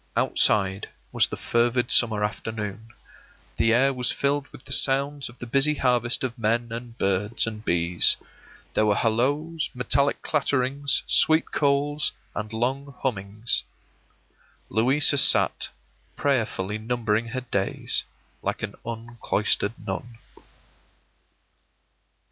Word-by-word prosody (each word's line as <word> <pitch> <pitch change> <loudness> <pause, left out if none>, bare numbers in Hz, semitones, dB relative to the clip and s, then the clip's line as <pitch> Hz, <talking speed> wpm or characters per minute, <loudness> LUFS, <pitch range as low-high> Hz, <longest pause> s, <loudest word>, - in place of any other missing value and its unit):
Outside 95 -1 +2 0.2
was - - +4
the - - -6
fervid 120 +1 +1
summer 110 -3 +3
afternoon; 105 0 -4 0.7
the 115 - +3
air 135 +4 +3
was 125 -1 0
filled 140 0 -1
with - - -15
the - - -11
sounds 140 +1 +1
of 120 - -15
the - - -7
busy 140 +5 +3
harvest 125 -3 +1
of 120 -2 -4
men 115 +1 0
and 120 0 -7
birds 100 +3 +1
and 110 -1 -6
bees; 85 -2 +2 0.6
there 110 - +2
were 105 - +3
halloos, 145 +10 0
metallic 140 +3 +1
clatterings, 140 -1 0
sweet 160 +1 +4
calls, 145 +1 +1 0.2
and 105 0 -5
long 135 +5 -2
hummings. 105 -2 -1 1.1
Louisa 135 +5 +3
sat, 140 - +3 0.5
prayerfully 110 -7 -1
numbering 115 -1 -1
her 130 +2 -4
days, 100 -6 -1 0.4
like - - -3
an - - -3
uncloistered 115 -2 -1
nun. 115 +4 -5
120 Hz, 115 wpm, -25 LUFS, 110-140 Hz, 1.1 s, was